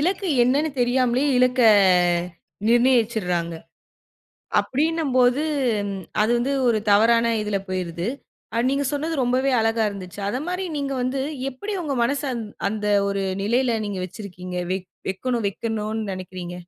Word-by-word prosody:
இலக்கு 375 +5 0 0.2
என்னன்னு 285 +5 +2
தெரியாமலே 250 +1 +2
இலக்க 250 0 +3 1.1
நிர்நயிச்சுர்றாங்க. 225 -9 +2 1.1
அப்டின்னும்போது 280 -3 +1 0.8
அது 215 - +1
வந்து 255 +4 0 0.2
ஒரு 225 -2 +3
தவறான 230 +2 +4
இதில 210 -1 -1
போயுருது. 180 0 -3 0.6
நீங்க 280 +1 0
சொன்னது 310 +3 -2
ரொம்பவே 255 +2 +1
அழகா 225 0 +1
இருந்துச்சு. 195 -2 -8
அத 225 - -2
மாரி 360 +1 -2
நீங்க 280 -1 -2
வந்து, 255 +2 -1 0.3
எப்டி 405 +12 -6
உங்க 290 -4 -2
மனச 275 +4 +1
அந் 230 - -4 0.2
அந்த 210 0 -3 0.2
ஒரு 200 0 -1 0.2
நிலையில 240 +3 +1
நீங்க 200 -2 -4
வெச்சுருக்கீங்க. 180 -2 -8 0.2
வெக் 185 -1 -4 0.2
வெக்கணும் 235 +4 -2
வெக்கணுன்னு 220 0 -3
நெனைக்கிறீங்க. 185 -1 -7
235 Hz, 120 wpm, -23 LUFS, 200-265 Hz, 1.1 s, தவறான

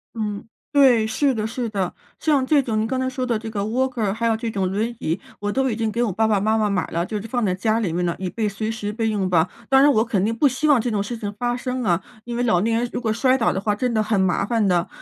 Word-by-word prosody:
嗯， 210 -1 -4 0.2
对， 260 -7 +5
是 270 +5 +1
的 215 -3 -2
是 230 +1 -3
的。 195 -4 -2 0.3
像 290 -4 +2
这 285 +1 +4
种 220 -3 -1
您 220 - 0
刚 260 +1 -1
才 260 - 0
说 260 0 -2
的 235 -3 0
这 220 +1 -6
个 205 -2 -2
walker 235 -1 0
还 230 +3 -2
有 225 -1 +3
这 225 +1 -3
种 190 -3 -1
轮 215 +4 0
椅， 165 +4 -1 0.2
我 205 0 -2
都 265 +3 +1
已 225 - -1
经 225 -1 -1
给 235 - -1
我 215 - 0
爸 220 +4 +1
爸 210 -2 +2
妈 215 +3 +1
妈 215 -1 +1
买 185 -4 0
了 170 +1 -2
就 210 0 -4
是 220 - -8
放 240 0 -1
在 185 - +1
家 220 +4 0
里 180 -7 -1
面 175 +1 0
了， 170 - -1
以 185 -1 -3
备 215 0 -1
随 215 +2 -3
时 210 -2 -4
备 225 0 -1
用 200 -3 -1
吧。 170 0 +3 0.2
当 270 0 +6
然 290 +1 +6
我 220 -2 +3
肯 205 -5 0
定 225 +1 0
不 285 +4 +4
希 270 +4 0
望 275 -6 +5
这 245 - -2
种 205 -3 0
事 240 +4 -5
情 205 -2 -4
发 245 +1 -1
生 255 0 -3
啊， 175 -4 +1 0.2
因 240 0 -5
为 245 - -1
老 180 -7 +3
年 225 +1 +1
人 245 - -2
如 - - -3
果 220 -3 0
摔 255 +3 +3
倒 225 - +1
的 190 - -2
话 210 0 0
真 245 +2 -1
的 220 - +2
很 215 -1 0
麻 190 -1 +2
烦 225 -2 +1
的， 175 -1 +2
220 Hz, 350 characters per minute, -22 LUFS, 205-245 Hz, 0.3 s, 当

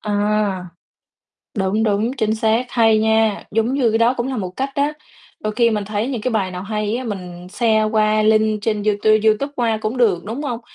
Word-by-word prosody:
À. 205 -2 0 0.9
Đúng, 200 +3 0
đúng, 215 +2 +1
chính 220 -1 0
xác, 220 +3 +1
hay 225 -2 +4
nha. 220 -1 +2
Giống 225 +4 0
như 255 -5 +2
cái 225 - +2
đó 235 +2 +3
cũng 240 - -1
là 265 -2 -3
một 185 -3 -3
cách 270 +1 -2
á, 285 +2 +1 0.5
đôi 215 0 -3
khi 235 0 +3
mình 210 -2 -2
thấy 210 +2 -2
những 250 -5 -3
cái 255 - -1
bài 195 -4 -1
nào 180 +1 -6
hay 210 +1 -2
á, 260 - -5
mình 180 -5 -7
share 220 0 +2
qua 215 0 +2
link 215 0 +2
trên 210 -1 -1
du 215 - +3
tu 215 - +3 0.2
Youtube 220 +7 +2
qua 230 -3 0
cũng 220 +4 -3
được, 200 -8 +2
đúng 230 +7 -5
hông? 245 -5 -3
220 Hz, 220 wpm, -19 LUFS, 210-230 Hz, 0.9 s, hay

